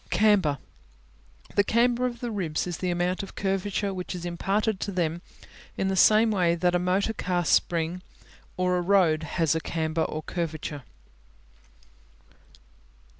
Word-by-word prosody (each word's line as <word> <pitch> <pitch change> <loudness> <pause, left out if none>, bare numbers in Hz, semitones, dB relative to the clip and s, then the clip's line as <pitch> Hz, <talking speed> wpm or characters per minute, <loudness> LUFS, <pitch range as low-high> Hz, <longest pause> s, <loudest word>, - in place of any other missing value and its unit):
Camber 200 -9 +3 1.0
The 200 - +4
camber 240 +3 +2
of 240 -1 -7
the 240 -2 -3
ribs 175 -7 -2
is 175 -2 -5
the 185 - -1
amount 175 +1 0
of 195 - -9
curvature 195 +1 -1
which 180 0 -5
is 175 -1 -6
imparted 195 +4 -1
to 200 - -3
them 170 -2 -1 0.6
in 190 - 0
the 190 - 0
same 215 +4 +5
way 175 -4 +2
that 175 +1 +1
a 180 - +2
motor 185 +5 0
car 180 -4 -1
spring 170 +3 +1 0.6
or 180 0 +1
a - - 0
road 175 -4 +3
has 160 0 0
a 160 - 0
camber 160 0 -2
or 155 0 -2
curvature. 155 -4 -4
180 Hz, 150 wpm, -26 LUFS, 170-200 Hz, 1.0 s, same